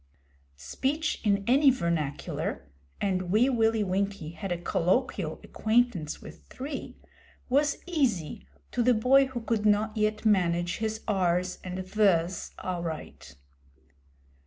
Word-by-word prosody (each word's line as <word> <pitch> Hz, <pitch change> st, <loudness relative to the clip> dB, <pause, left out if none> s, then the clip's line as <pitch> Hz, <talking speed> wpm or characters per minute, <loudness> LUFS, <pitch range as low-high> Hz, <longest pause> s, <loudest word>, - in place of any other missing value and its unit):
Speech 275 Hz, -, -2 dB
in 200 Hz, -2 st, +2 dB
any 275 Hz, +5 st, +5 dB
vernacular 165 Hz, -, -2 dB, 0.3 s
and 185 Hz, -2 st, -1 dB
Wee 230 Hz, +6 st, +4 dB
Willie 225 Hz, -2 st, +2 dB
Winkie 195 Hz, -4 st, -2 dB
had 195 Hz, +2 st, -6 dB
a 175 Hz, -, 0 dB
colloquial 175 Hz, 0 st, 0 dB
acquaintance 220 Hz, -8 st, 0 dB
with -, -, -12 dB
three 275 Hz, +2 st, -7 dB, 0.5 s
was 285 Hz, +3 st, +2 dB
easy 260 Hz, -, -1 dB, 0.2 s
to 245 Hz, -, 0 dB
the 245 Hz, +1 st, +4 dB
boy 265 Hz, +5 st, +5 dB
who 260 Hz, -2 st, -5 dB
could 225 Hz, -2 st, -1 dB
not 215 Hz, +1 st, +2 dB
yet 215 Hz, 0 st, 0 dB
manage 175 Hz, -4 st, +2 dB
his 220 Hz, 0 st, -3 dB
'r's' 180 Hz, -3 st, 0 dB
and 185 Hz, 0 st, -5 dB
'th's' 185 Hz, -3 st, +1 dB
aright. 165 Hz, -, -5 dB
205 Hz, 120 wpm, -28 LUFS, 175-240 Hz, 0.5 s, any